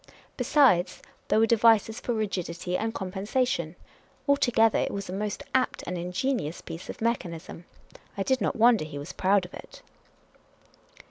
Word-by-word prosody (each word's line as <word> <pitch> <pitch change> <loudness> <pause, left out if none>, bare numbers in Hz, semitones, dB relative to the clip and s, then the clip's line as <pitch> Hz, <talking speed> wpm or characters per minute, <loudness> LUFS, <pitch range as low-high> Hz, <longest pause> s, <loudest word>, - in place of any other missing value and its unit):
Besides, 250 - +3 0.2
there - - +2
were 220 - +5
devices 225 -1 +3
for 240 - -2
rigidity 180 -4 -3
and 225 +4 -1
compensation. 190 -2 -2 0.5
Altogether, 240 -6 +3
it - - -1
was 200 -1 -5
a - - -4
most 205 +1 -3
apt 260 -1 0
and 180 - -4
ingenious 180 - -2
piece 165 - -9
of - - -8
mechan 220 -7 -1
ism. 165 +1 -11 0.5
I 195 - 0
did 260 +2 +1
not - - 0
wonder 230 -4 +5
he 155 -2 -7
was 145 +4 -7
proud 190 0 +2
of 180 - -14
it. - - -12
205 Hz, 155 wpm, -27 LUFS, 180-235 Hz, 0.5 s, were